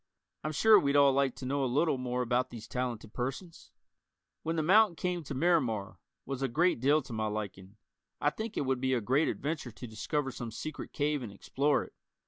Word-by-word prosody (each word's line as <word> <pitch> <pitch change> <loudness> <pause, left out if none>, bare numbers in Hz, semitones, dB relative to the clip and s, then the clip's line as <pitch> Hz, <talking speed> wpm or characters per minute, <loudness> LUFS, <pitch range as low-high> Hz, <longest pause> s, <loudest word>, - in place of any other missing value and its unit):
I'm 155 - -2
sure 215 +7 +6
we'd 140 -4 +1
all 140 -1 +6
like 135 -2 +1
to 130 - -7
know 140 +2 0
a 130 - 0
little 145 0 +2
more 125 0 -1
about 125 +1 0
these 115 -3 -9
talented 120 -4 -4
persons. 135 +8 -5 0.7
"When 165 +1 -2
the 160 - 0
Mountain 200 +2 +5
Came 180 0 -2
to 140 - -5
Miramar" 130 - +1 0.3
was 135 -1 -4
a 135 - +1
great 170 +5 +2
deal 145 +4 +3
to 120 - -9
my 110 -1 -1
liking. 100 -3 -6 0.4
I 145 - +2
think 220 +6 -5
it - - 0
would 130 -1 0
be 130 0 +2
a - - +1
great 130 +8 +2
adventure 145 -3 -3
to 120 +2 -10
discover 135 +5 -2
some 120 -2 -6
secret 155 +7 -6
cave 145 -1 0
and 115 -5 -6
explore 140 +8 0
it. - - -14
135 Hz, 210 wpm, -31 LUFS, 120-155 Hz, 0.7 s, sure